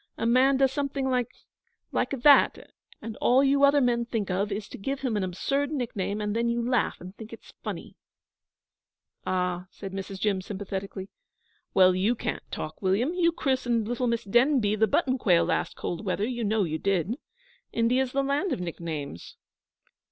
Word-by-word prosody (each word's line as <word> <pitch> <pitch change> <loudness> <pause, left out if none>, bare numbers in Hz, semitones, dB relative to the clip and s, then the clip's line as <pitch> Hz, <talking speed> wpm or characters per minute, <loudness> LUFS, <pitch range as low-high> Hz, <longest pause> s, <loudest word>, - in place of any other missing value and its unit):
'A - - -2
man 260 +3 +4
does 265 -1 +3
something 275 -1 -2
like 250 -2 +1 0.6
like - - 0
that 275 +2 +4 0.3
and 225 -1 -5
all 260 +3 +4
you 280 +1 +3
other 280 +1 +6
men 240 -2 +2
think 225 -5 -3
of 200 +3 -1
is 200 +1 -3
to - - -10
give 270 +7 -3
him 255 -5 -1
an 205 - 0
absurd 275 +10 -1
nickname, 220 -8 -2
and 210 0 -2
then 235 +1 +1
you 235 0 0
laugh 250 -2 +1
and 185 +2 -10
think 220 -1 -10
it's 230 - -12
funny.' - - -6 1.3
'Ah,' 180 -1 -1
said 195 0 -8
Mrs. 195 0 -6
Jim, 195 -2 +1
sympathetically. 195 -1 -5 0.7
'Well, 185 -1 +6
you 195 +6 +1
can't - - -3
talk, 155 0 -6
William. 205 - +1
You 345 -2 +3
christened 250 -7 0
little 245 +1 -1
Miss 235 -1 0
Demby 240 0 +3
the 220 +1 +3
Button 260 - +1
quail 175 -7 +4
last - - -1
cold 175 +4 -4
weather; 200 +1 -1
you 240 -2 -3
know 215 0 +1
you 160 -2 -2
did. 195 +1 0 0.6
India's 250 +3 +1
the 275 +1 +1
land 285 +7 0
of - - -1
nicknames.' 160 - -6
225 Hz, 175 wpm, -27 LUFS, 195-260 Hz, 1.3 s, other